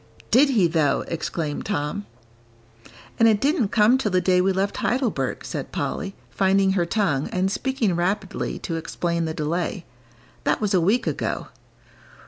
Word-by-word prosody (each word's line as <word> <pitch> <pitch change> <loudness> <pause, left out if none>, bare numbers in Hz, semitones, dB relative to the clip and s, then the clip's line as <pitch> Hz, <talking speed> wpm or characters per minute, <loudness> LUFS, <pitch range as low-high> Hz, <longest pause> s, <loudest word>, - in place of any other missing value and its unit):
"Didn't 275 +1 +5
he 195 -5 +5
though!" 160 -3 +2
exclaimed 155 -2 -3
Tom. 200 +1 -2 1.1
"And 230 - +6
it 215 -2 +4
didn't 275 - +2
come 220 +5 +4
till 220 - 0
the 185 -1 +2
day 180 0 +3
we 190 +1 +2
left 195 +2 -1
Heidelberg," 250 -2 -1
said - - -5
Polly, 195 -2 -3 0.2
finding 195 0 +3
her 180 -3 +1
tongue, 170 -9 0
and 185 +1 0
speaking 245 -7 0
rapidly 190 +3 -2
to 165 -3 -4
explain 170 +1 -2
the 160 -1 -3
delay; 170 +3 -2 0.6
"that - - +1
was 210 -2 0
a 185 - +4
week 215 +9 +2
ago." - - -2
190 Hz, 155 wpm, -23 LUFS, 170-215 Hz, 1.1 s, And